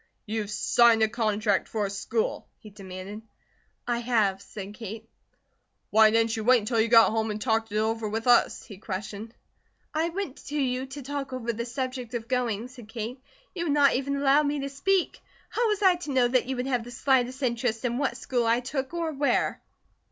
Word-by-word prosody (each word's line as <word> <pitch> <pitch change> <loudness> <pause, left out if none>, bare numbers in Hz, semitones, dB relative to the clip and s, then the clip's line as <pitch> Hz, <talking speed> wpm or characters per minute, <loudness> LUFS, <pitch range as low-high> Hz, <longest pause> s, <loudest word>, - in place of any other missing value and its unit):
"You've 215 -1 -3
signed 225 +3 +4
a - - +5
contract 215 -3 0
for 215 -2 -1
a - - -3
school?" 220 +3 -2
he 215 - -14
demanded. 195 +1 -8 0.7
"I 240 -1 0
have," 220 -5 +1
said 200 -1 -8
Kate. 220 0 -8 0.8
"Why 220 0 +7
didn't 225 +1 +2
you 220 - -3
wait 250 +3 +6
until 225 +1 0
you 225 - +2
got 230 -1 +6
home 220 0 0
and 210 0 -3
talked 225 -1 0
it 210 - -1
over 220 0 0
with 225 +2 -3
us?" 245 -1 +4
he 200 -4 -12
questioned. 210 +2 -6 0.6
"I 320 +2 +1
went 345 -6 -4
to 295 +1 -2
you 260 -1 -1
to 275 +1 -8
talk 275 0 -4
over 235 -2 -2
the 235 +2 -4
subject 255 -1 -4
to 240 - 0
going," 235 -2 -1
said 245 -4 -13
Kate. 235 +3 -5 0.3
"You 345 -3 -3
would 295 - +1
not 285 -1 +5
even 275 +2 -1
allow 280 +1 +4
me 290 -1 -1
to 275 - -3
speak. 365 +7 0 0.3
How 480 - +1
was 420 -1 0
I 370 -2 +5
to 345 -4 -6
know 255 -2 +4
that 250 0 +2
you 265 - -2
would 250 0 -2
have 250 -3 0
the 240 - -10
slightest 260 +1 +1
interest 235 -1 -1
in 240 +1 -1
what 280 - -1
school 245 -3 -1
I 230 +1 +3
took, 265 +4 -4
or 335 -2 -1
where." 285 -1 0
240 Hz, 205 wpm, -27 LUFS, 220-270 Hz, 0.8 s, Why